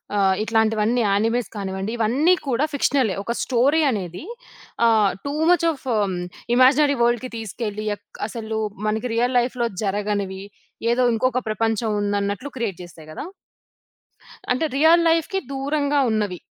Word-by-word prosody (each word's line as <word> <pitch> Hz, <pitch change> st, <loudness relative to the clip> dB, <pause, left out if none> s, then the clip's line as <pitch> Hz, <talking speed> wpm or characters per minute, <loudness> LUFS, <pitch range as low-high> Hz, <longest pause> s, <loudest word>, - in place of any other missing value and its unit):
ఆహ్, 195 Hz, -2 st, +3 dB
ఇట్లాంటివన్నీ 220 Hz, +1 st, +1 dB
యానిమేల్స్ 225 Hz, +4 st, +1 dB
కానివ్వండి 195 Hz, 0 st, -4 dB
ఇవన్నీ 255 Hz, +10 st, +3 dB
కూడా 265 Hz, +3 st, +1 dB
ఫిక్షనలే. 260 Hz, -6 st, +1 dB
ఒక 235 Hz, -, -3 dB
స్టోరీ 270 Hz, +6 st, +2 dB
అనేది 185 Hz, -, -5 dB, 0.6 s
ఆహ్, 215 Hz, -4 st, +4 dB
టూ 280 Hz, -, -2 dB, 0.2 s
మచ్ 350 Hz, -1 st, +3 dB
ఆఫ్ 285 Hz, -, -10 dB
హ్మ్. 200 Hz, -4 st, 0 dB, 0.4 s
ఇమాజినరీ 280 Hz, +3 st, +5 dB
వరల్డ్‌కి 240 Hz, +1 st, +1 dB
తీసుకెళ్ళి 215 Hz, -1 st, -5 dB
అక్ -, -, -20 dB
అసలు 220 Hz, -1 st, -4 dB, 0.3 s
మనకి 220 Hz, +3 st, -1 dB
రియల్ 245 Hz, +2 st, +1 dB
లైఫ్‌లో 240 Hz, -1 st, -1 dB, 0.2 s
జరగనివి, 200 Hz, -1 st, -2 dB, 0.5 s
ఏదో 250 Hz, +1 st, +2 dB
ఇంకొక 255 Hz, +2 st, 0 dB
ప్రపంచం 225 Hz, 0 st, 0 dB
ఉందన్నట్లు 205 Hz, +5 st, -2 dB
క్రియేట్ 220 Hz, -7 st, -3 dB
చేస్తాయి 160 Hz, -3 st, -13 dB
కదా! -, -, -6 dB, 1.3 s
అంటే 255 Hz, +6 st, +1 dB
రియల్ 325 Hz, +3 st, +5 dB
లైఫ్‌కి 330 Hz, +4 st, +1 dB
దూరంగా 285 Hz, +1 st, 0 dB
ఉన్నవి. 210 Hz, -4 st, -1 dB
225 Hz, 130 wpm, -22 LUFS, 205-260 Hz, 1.3 s, ఇమాజినరీ